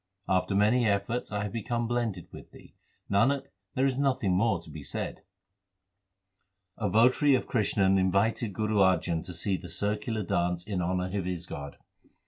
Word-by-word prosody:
After 95 +1 +1
many 110 +4 +3
efforts 100 +4 -1
I 105 0 -1
have 105 - -4
become 120 +1 -2
blended 115 -7 -2
with - - -11
Thee; - - -16 0.3
Nanak, 135 +7 +2 0.3
there 130 - +2
is 135 -1 0
nothing 130 -9 +1
more 110 -1 +2
to 80 - -14
be 75 - -8
said. 70 - -5 1.6
A 105 -3 0
votary 130 +7 +4
of 130 - -1
Krishan 95 -4 +2
invited 100 +4 +1
Guru 110 +2 -1
Arjan 90 -4 +2
to - - -8
see 95 +3 -1
the 90 - -10
circular 105 +1 -2
dance 90 0 -1
in 100 -4 -2
honour 90 +2 -1
of 95 -3 -1
his 90 -2 -3
god. 70 -3 -7
100 Hz, 165 wpm, -29 LUFS, 90-115 Hz, 1.6 s, votary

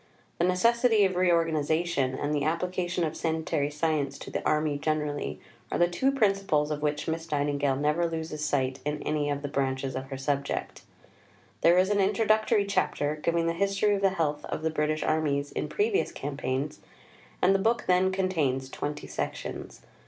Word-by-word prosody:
The 170 - +3
necessity 225 +3 +4
of 185 -1 0
reorganization, 165 -5 +1
and 145 +3 -2
the 145 -1 0
application 175 +2 -1
of 160 -1 -2
sanitary 160 -3 -1
science 150 -2 -1
to - - -9
the - - -3
Army 150 -1 +1
generally, 150 -1 -2 0.3
are - - 0
the 175 - +4
two 260 +10 +1
principles 195 - +1
of 150 -1 -3
which 150 0 -1
Miss 165 0 -3
Nightingale 145 -2 +1
never 150 +5 +1
loses 160 -2 -4
sight 135 -3 0
in 150 0 -3
any 150 -1 0
of 145 0 -2
the - - -2
branches 135 -2 -1
of 130 0 -4
her 135 0 -6
subject. 140 +1 -2 0.8
There 170 +1 +5
is 185 +2 +3
an 205 - +2
Introductory 215 +1 +3
Chapter 150 -6 0
giving 165 +2 0
the 165 - +1
history 200 +3 +1
of 200 - -1
the 195 - +4
health 150 -5 -1
of 155 - -4
the 160 - +1
British 155 0 0
armies 145 -2 0
in - - -3
previous 415 -1 0
campaigns, 140 +1 -3 0.6
and 190 - +4
the 195 - +2
book 230 +4 +1
then 185 +1 +3
contains 155 -9 0
twenty 145 0 -4
sections. - - -5
155 Hz, 175 wpm, -28 LUFS, 145-185 Hz, 0.8 s, There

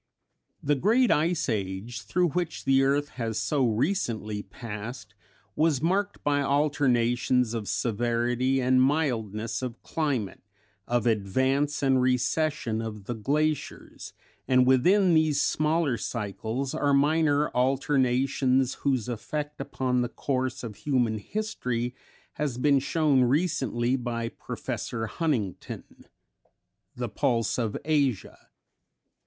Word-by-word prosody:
The 145 - +2
great 225 - +3
Ice 165 +2 +1
Age 105 +1 -3
through 180 +5 +1
which 170 0 -3
the 135 0 +4
earth 140 +2 +1
has 110 -1 -1
so 130 +6 +1
recently 110 - -1
passed 105 +2 -8 0.4
was 155 -3 +2
marked 200 +4 0
by 145 -1 +2
alternations 125 -4 +2
of 110 -3 -4
severity 120 +3 0
and 130 0 +3
mildness 115 -7 0
of 125 -2 -5
climate, 135 -11 -2 0.5
of 120 -2 0
advance 130 +8 +1
and 135 -1 +3
recession 130 -1 0
of 105 -2 -6
the 120 - -4
glaciers, 150 +7 -2 0.3
and 130 -1 +4
within 175 +9 +4
these 155 -2 +3
smaller 155 -3 +1
cycles 115 +4 -3
are 145 -1 +2
minor 150 0 +3
alternations 130 0 +1
whose 130 -5 0
effect 145 +5 -4
upon 130 -2 -1
the 120 - -1
course 130 -2 -2
of 110 -4 -7
human 120 -6 0
history 125 - -3 0.4
has 145 -5 -2
been 140 +1 +3
shown 145 -1 +2
recently 130 - +1
by 120 -2 -3
Professor 115 0 -5
Huntington 115 - -2 1.1
("The - - -3
Pulse 115 0 0
of 110 -3 -1
Asia"). 140 -8 -1
130 Hz, 115 wpm, -27 LUFS, 115-145 Hz, 1.1 s, the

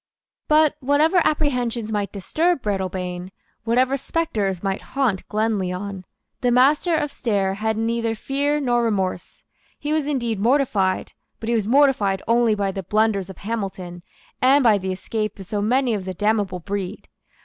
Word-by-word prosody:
But, 305 -1 +4
whatever 300 +6 +3
apprehensions 245 -7 0
might 205 -2 -1
disturb 310 - 0
Breadalbane, 185 -3 -3 0.4
whatever 255 +4 +2
spectres 215 - -2
might 195 0 -1
haunt 255 -9 -1
Glenlyon, 200 -3 -2 0.4
the 250 - +2
Master 285 +7 +4
of 295 -2 -1
Stair 200 -7 0
had 220 +2 -1
neither 230 0 -1
fear 285 +5 -1
nor 240 -4 +1
remorse. 190 -5 -2 0.3
He 295 +1 -2
was 310 -2 0
indeed 235 -7 -1
mortified; 215 -6 +1 0.3
but 225 - -5
he - - +2
was 215 -3 0
mortified 235 -7 +3
only 230 -2 +3
by 200 -1 -1
the 195 - -4
blunders 210 0 +1
of 190 - -9
Hamilton 195 -5 -5 0.4
and 270 +2 +5
by 215 -4 +5
the 190 0 -3
escape 215 +3 -3
of 195 - -9
so 205 +2 -2
many 245 +3 +2
of 200 -3 -3
the 185 -1 -5
damnable 205 -3 0
breed. 200 +2 -5
220 Hz, 155 wpm, -22 LUFS, 195-260 Hz, 0.4 s, and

